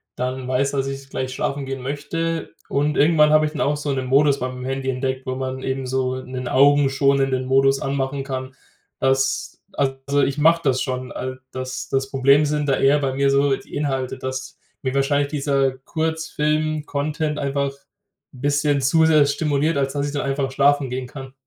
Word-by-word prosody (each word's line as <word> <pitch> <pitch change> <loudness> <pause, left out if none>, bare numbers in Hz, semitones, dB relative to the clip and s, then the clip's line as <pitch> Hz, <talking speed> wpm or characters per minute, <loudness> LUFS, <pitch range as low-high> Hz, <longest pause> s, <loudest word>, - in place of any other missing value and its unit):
dann 125 +1 -3
weiß, 130 +2 +1
dass 135 -1 -1
ich 135 0 -6
gleich 130 -1 -3
schlafen 140 +1 -2
gehen 135 -1 -5
möchte. 160 +4 -3 0.2
Und 145 +2 0
irgendwann 150 0 +5
habe 155 0 +5
ich 150 - -2
dann 150 - -4
auch 145 +1 +1
so 145 -1 -3
'nen 130 -1 -2
Modus 140 +1 +4
beim 125 0 -4
Handy 135 0 -2
entdeckt, 130 0 -2
wo 130 - -3
man 130 0 -4
eben 130 0 -2
so 130 0 -1
'nen 130 -1 -6
augenschonenden 135 -1 +3
Modus 135 +1 +3
anmachen 135 0 -2
kann, 130 -1 -5 0.5
dass 135 0 +1 0.3
also, 140 +1 0
ich 140 +1 0
mache 165 +2 +4
das 130 -2 +1
schon, 130 -2 -3
al 130 0 -5
das 130 -1 -5
das 135 0 -1
Problem 140 +2 +4
sind 150 0 -1
da 135 - +4
eher 140 +2 +4
bei 135 -2 -1
mir 140 +1 +2
so 140 0 +3
die - - -16
Inhalte, 135 -3 -2
dass 130 0 -5 0.3
mir 130 -1 -1
wahrscheinlich 140 +1 +2
dieser 140 -2 +1
Kurzfilm-Content 155 -1 -1
einfach 140 0 -1 0.6
bisschen 145 +2 +1
zu 160 +5 +4
sehr 155 -2 +5
stimuliert, 150 +2 0
als 135 -1 0
dass 145 0 -1
ich 145 - -5
dann 145 - -1
einfach 135 0 -1
schlafen 140 0 +3
gehen 125 0 -4
kann. 135 0 -10
135 Hz, 180 wpm, -22 LUFS, 130-145 Hz, 0.6 s, irgendwann